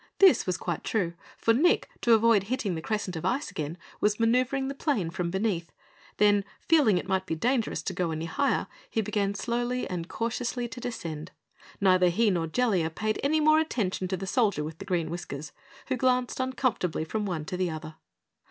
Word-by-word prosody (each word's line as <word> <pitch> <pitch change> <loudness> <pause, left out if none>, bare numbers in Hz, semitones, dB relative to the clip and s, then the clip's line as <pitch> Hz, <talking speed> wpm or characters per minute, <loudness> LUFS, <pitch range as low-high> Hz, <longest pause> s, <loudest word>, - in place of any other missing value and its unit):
This 385 - +6
was 185 - 0
quite 175 -3 -3
true, 180 -6 0 0.2
for 230 - +3
Nick, 330 +10 +3
to 235 - +5
avoid 225 -3 +5
hitting 225 -4 -1
the 160 - -4
crescent 205 -2 -2
of 160 - -5
ice 200 +6 -1
again, 155 -2 -4 0.2
was 210 +1 +1
maneuvering 255 +4 +2
the 275 - -3
plane 265 - -1
from 175 -1 -2
beneath; 190 -3 -1 0.5
then, 205 -1 +4 0.2
feeling 290 - +5
it 180 - -3
might 190 -1 0
be 160 - -1
dangerous 240 +6 0
to 190 - -3
go 180 -1 -1
any 160 0 -3
higher, 280 +12 +1 0.2
he 225 - 0
began 200 -1 -1
slowly 240 +4 -1
and 175 -2 -4
cautiously 240 +1 -2
to 245 - -8
descend. 165 -10 -5 0.5
Neither 185 -2 +5
he 210 +5 +3
nor 170 -3 0
Jellia 190 -4 +1
paid 215 +6 -2
any 310 +3 +2
more 310 +1 +5
attention 205 -12 -1
to 190 0 -2
the 195 - -5
Soldier 200 - +1
with 155 +4 -6
Green 175 -4 -1
Whiskers, 155 -4 -6 0.4
who 260 - +1
glanced 255 0 +1
uncomfortably 255 -11 0
from 210 +5 -2
one 165 -5 -3
to 180 - -4
the 180 -1 0
other. 155 -1 -7
200 Hz, 190 wpm, -28 LUFS, 175-245 Hz, 0.5 s, This